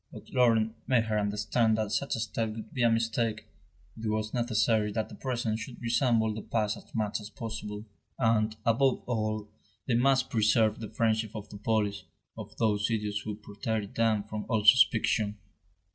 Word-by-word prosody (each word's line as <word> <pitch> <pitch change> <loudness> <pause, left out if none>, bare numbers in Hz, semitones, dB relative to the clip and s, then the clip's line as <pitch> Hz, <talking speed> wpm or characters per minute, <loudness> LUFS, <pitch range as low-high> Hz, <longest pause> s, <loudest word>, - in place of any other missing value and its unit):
But - - -12
Laurent 115 -3 +3
made 125 -3 +3
her 110 -1 0
understand 105 +2 +1
that 110 -2 -2
such 100 - 0
a - - -4
step 110 0 -2
would 110 - -9
be 125 - -2
a 120 - +5
mistake; 115 0 0 0.5
it 110 0 -5
was 110 0 -2
necessary 110 -3 +1
that 110 0 -2
the - - -11
present 120 -4 -2
should 120 +2 -8
resemble 115 -2 +2
the 110 - -5
past 110 -1 -1
as - - -14
much 110 -1 -1
as 105 - -9
possible; 110 -4 -6 0.3
and, 110 -2 +2
above 125 +3 +2
all, 110 -3 -2 0.4
they 130 - 0
must 130 +2 +3
preserve 110 -1 +3
the 110 -2 -6
friendship 110 0 0
of 105 -1 -7
the 105 - -9
police, 105 -3 0 0.3
of - - -9
those 105 -1 +1
idiots 105 -2 -1
who 105 0 -5
protected 105 0 -4
them 110 -2 +2
from 105 0 -6
all 110 -3 +1
suspicion. 110 -3 +4
110 Hz, 175 wpm, -29 LUFS, 105-115 Hz, 0.5 s, a